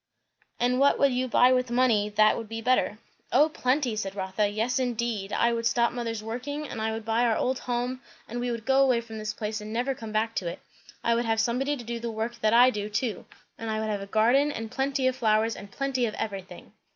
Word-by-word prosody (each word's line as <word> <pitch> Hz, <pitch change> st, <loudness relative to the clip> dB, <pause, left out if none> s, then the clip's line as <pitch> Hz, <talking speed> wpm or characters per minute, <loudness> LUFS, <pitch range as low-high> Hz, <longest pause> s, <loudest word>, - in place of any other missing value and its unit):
"And 250 Hz, +1 st, +2 dB
what 280 Hz, +1 st, +4 dB
would 280 Hz, -1 st, +4 dB
you 255 Hz, +1 st, 0 dB
buy 250 Hz, +1 st, +5 dB
with 255 Hz, -1 st, +1 dB
money, 240 Hz, -4 st, +2 dB
that 215 Hz, +1 st, +4 dB
would 225 Hz, -2 st, -6 dB
be 225 Hz, 0 st, -4 dB
better?" 225 Hz, -2 st, +1 dB, 0.3 s
"O 305 Hz, +2 st, +5 dB
plenty!" 255 Hz, -5 st, 0 dB
said 195 Hz, -2 st, -4 dB
Rotha. 190 Hz, +2 st, 0 dB
"Yes, 225 Hz, +5 st, -1 dB
indeed! 235 Hz, -5 st, -2 dB
I 235 Hz, +3 st, +2 dB
would 230 Hz, 0 st, 0 dB
stop 235 Hz, 0 st, +2 dB
mother's 230 Hz, -3 st, -4 dB
working; 285 Hz, +7 st, -4 dB
and 220 Hz, -, -6 dB
I 220 Hz, 0 st, 0 dB
would 220 Hz, 0 st, -5 dB
buy 225 Hz, +2 st, +1 dB
our 230 Hz, -2 st, +2 dB
old 255 Hz, 0 st, 0 dB
home, 245 Hz, +1 st, -2 dB, 0.3 s
and 240 Hz, +2 st, -5 dB
we 245 Hz, 0 st, -2 dB
would 230 Hz, -2 st, -4 dB
go 270 Hz, 0 st, +4 dB
away 255 Hz, -3 st, +4 dB
from 225 Hz, -1 st, -8 dB
this 215 Hz, 0 st, -3 dB
place 215 Hz, 0 st, -4 dB
and 210 Hz, +1 st, -7 dB
never 245 Hz, +4 st, 0 dB
come 225 Hz, -4 st, -8 dB
back 220 Hz, +1 st, 0 dB
to 180 Hz, -, -1 dB
it. 170 Hz, -, -5 dB, 0.4 s
I 235 Hz, -, +3 dB
would 235 Hz, +1 st, 0 dB
have 225 Hz, -1 st, +1 dB
somebody 265 Hz, +5 st, 0 dB
to 245 Hz, -, -8 dB
do 235 Hz, +1 st, -4 dB
the 235 Hz, 0 st, -4 dB
work 225 Hz, +1 st, -4 dB
that 215 Hz, -, +3 dB
I 245 Hz, +2 st, +7 dB
do, 210 Hz, -2 st, -4 dB
too; 220 Hz, +1 st, -2 dB, 0.3 s
and 225 Hz, -, -4 dB
I 215 Hz, 0 st, -1 dB
would 220 Hz, 0 st, -2 dB
have 205 Hz, -1 st, -2 dB
a 195 Hz, -, -7 dB
garden, 240 Hz, +8 st, +3 dB
and 225 Hz, -4 st, -6 dB
plenty 270 Hz, 0 st, -1 dB
of 260 Hz, 0 st, +2 dB
flowers, 220 Hz, -1 st, +2 dB
and 200 Hz, -, -10 dB
plenty 260 Hz, +1 st, -1 dB
of 215 Hz, -, -5 dB
everything." 195 Hz, -3 st, -6 dB
235 Hz, 245 wpm, -27 LUFS, 215-250 Hz, 0.4 s, I